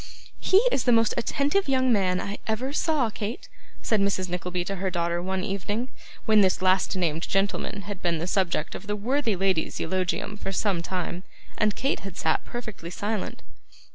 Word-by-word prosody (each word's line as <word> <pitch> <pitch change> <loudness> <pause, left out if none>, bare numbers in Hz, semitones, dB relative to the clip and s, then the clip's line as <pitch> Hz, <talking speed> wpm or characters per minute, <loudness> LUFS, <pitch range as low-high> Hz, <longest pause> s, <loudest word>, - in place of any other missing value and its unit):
'He 380 - +4
is 255 - +1
the 245 - +5
most 225 -1 +4
attentive 285 +8 +1
young 260 -2 +3
man 185 -3 +2
I 200 +1 -4
ever 245 +5 -1
saw, 295 -8 +1
Kate,' 215 +3 -5 0.4
said 220 -3 +2
Mrs. 190 -2 +1
Nickleby 180 0 -2
to 195 +1 -3
her 190 +1 -1
daughter 170 -1 0
one 190 +1 -2
evening, 205 +6 -2 0.4
when 215 -2 +6
this 190 -2 +3
last 185 +1 +3
named 165 -3 0
gentleman 200 +1 0
had 200 -2 -6
been 170 -2 +1
the 160 - -2
subject 180 -4 0
of 210 - -8
the 210 - 0
worthy 235 +1 0
lady's 185 -3 0
eulogium 185 +4 -1
for 195 - -4
some 195 -2 +1
time, 180 0 -3 0.3
and 210 -1 +2
Kate 275 - 0
had 195 -3 -8
sat 160 - +1
perfectly 215 -8 -6
silent. 205 +3 -3
195 Hz, 180 wpm, -26 LUFS, 180-220 Hz, 0.4 s, when